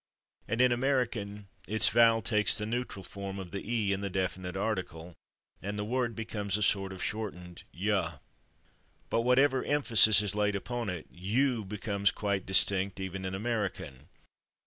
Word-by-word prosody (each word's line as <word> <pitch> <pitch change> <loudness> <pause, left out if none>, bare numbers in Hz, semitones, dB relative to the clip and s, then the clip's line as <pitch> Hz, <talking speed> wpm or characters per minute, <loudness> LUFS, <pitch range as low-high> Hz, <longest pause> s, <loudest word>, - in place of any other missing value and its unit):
and 115 +2 0
in 125 -1 +5
American 120 -6 -1 0.2
its 110 +2 +3
vowel 115 -1 +5
takes 105 -1 +3
the 105 - -3
neutral 115 -4 -3
form 100 +1 -7
of 95 -3 -7
the 100 - -4
/e/ 110 -3 0
in 100 0 -1
the 100 - -2
definite 95 0 -3
article, 90 -5 -3 0.5
and 100 +2 -4
the 105 - -2
word 120 0 -1
becomes 105 -3 -2
a 105 - 0
sort 95 -1 +2
of 95 - -6
shortened 90 -5 -5
/yuh/. 90 -4 -1 0.9
But 115 - +2
whenever 130 +2 +3
emphasis 110 -8 +4
is 100 -2 -2
laid 105 0 +1
upon 120 +2 -3
it, 90 -4 -6
/you/ 110 +4 0
becomes 100 -1 0
quite 100 -2 -2
distinct, 95 +1 +3
even 95 0 -5
in 95 0 -3
American. 100 - -3
105 Hz, 160 wpm, -30 LUFS, 95-115 Hz, 0.9 s, in